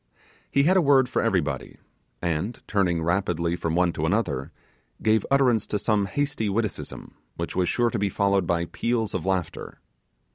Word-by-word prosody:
He 140 Hz, -, +3 dB
had 185 Hz, +5 st, +4 dB
a -, -, +5 dB
word 135 Hz, -4 st, +4 dB
for -, -, 0 dB
everybody; 80 Hz, -, -1 dB, 0.5 s
and, 85 Hz, +7 st, -2 dB
turning 90 Hz, -5 st, +1 dB
rapidly 85 Hz, -1 st, 0 dB
from 85 Hz, -2 st, -2 dB
one 90 Hz, -1 st, +2 dB
to 80 Hz, 0 st, -1 dB
another, 95 Hz, -, -1 dB, 0.5 s
gave 110 Hz, -1 st, +2 dB
utterance 125 Hz, -6 st, +3 dB
to 105 Hz, -, -1 dB
some 105 Hz, -1 st, +1 dB
hasty 140 Hz, -3 st, -1 dB
witticism, 105 Hz, +1 st, -3 dB, 0.2 s
which -, -, -4 dB
was 90 Hz, -1 st, +1 dB
sure 120 Hz, -1 st, +1 dB
to -, -, -2 dB
be 100 Hz, 0 st, +1 dB
followed 100 Hz, -2 st, +1 dB
by 85 Hz, 0 st, +1 dB
peals 115 Hz, +3 st, -1 dB
of 95 Hz, -1 st, -3 dB
laughter. 95 Hz, -4 st, -3 dB
100 Hz, 170 wpm, -25 LUFS, 85-115 Hz, 0.5 s, a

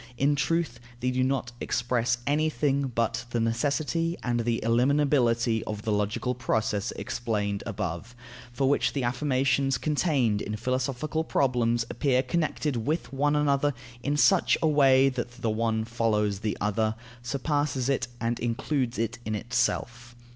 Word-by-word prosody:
In 145 Hz, +3 st, +3 dB
truth, 150 Hz, -3 st, 0 dB, 0.2 s
they 125 Hz, +1 st, 0 dB
do 130 Hz, 0 st, +1 dB
not 130 Hz, -2 st, -1 dB
express 120 Hz, 0 st, 0 dB
anything 145 Hz, -2 st, +1 dB
but 115 Hz, -1 st, -1 dB
the 120 Hz, -, -1 dB
necessity 145 Hz, +8 st, 0 dB
and 120 Hz, -1 st, 0 dB
the 115 Hz, 0 st, 0 dB
ineliminability 120 Hz, -2 st, +2 dB
of 105 Hz, -1 st, -4 dB
the 110 Hz, -, -1 dB
logical 105 Hz, +4 st, 0 dB
process 110 Hz, -4 st, -1 dB
explained 105 Hz, -4 st, -2 dB
above, 105 Hz, +1 st, -4 dB, 0.4 s
for 130 Hz, +3 st, 0 dB
which 145 Hz, -, +2 dB
the 140 Hz, -, -1 dB
affirmations 135 Hz, +1 st, +1 dB
contained 140 Hz, -, +1 dB
in 105 Hz, -, -3 dB
philosophical 130 Hz, +6 st, -1 dB
problems 120 Hz, -6 st, +1 dB
appear 130 Hz, -2 st, +1 dB
connected 150 Hz, 0 st, -1 dB
with 125 Hz, +2 st, -2 dB
one 145 Hz, +2 st, +2 dB
another 145 Hz, -1 st, +2 dB, 0.3 s
in 145 Hz, +3 st, -1 dB
such 190 Hz, +5 st, +4 dB
a -, -, +5 dB
way 135 Hz, -3 st, +5 dB
that 125 Hz, -2 st, -3 dB
the 115 Hz, -, +1 dB
one 110 Hz, 0 st, 0 dB
follows 105 Hz, -4 st, 0 dB
the 105 Hz, 0 st, -2 dB
other, 110 Hz, +1 st, 0 dB, 0.3 s
surpasses 140 Hz, 0 st, -1 dB
it, 135 Hz, -2 st, 0 dB
and 115 Hz, +1 st, -1 dB
includes 120 Hz, +1 st, -1 dB
it 115 Hz, +2 st, -2 dB
in 110 Hz, -1 st, -2 dB
itself. 120 Hz, +1 st, -2 dB
125 Hz, 145 wpm, -27 LUFS, 115-140 Hz, 0.4 s, a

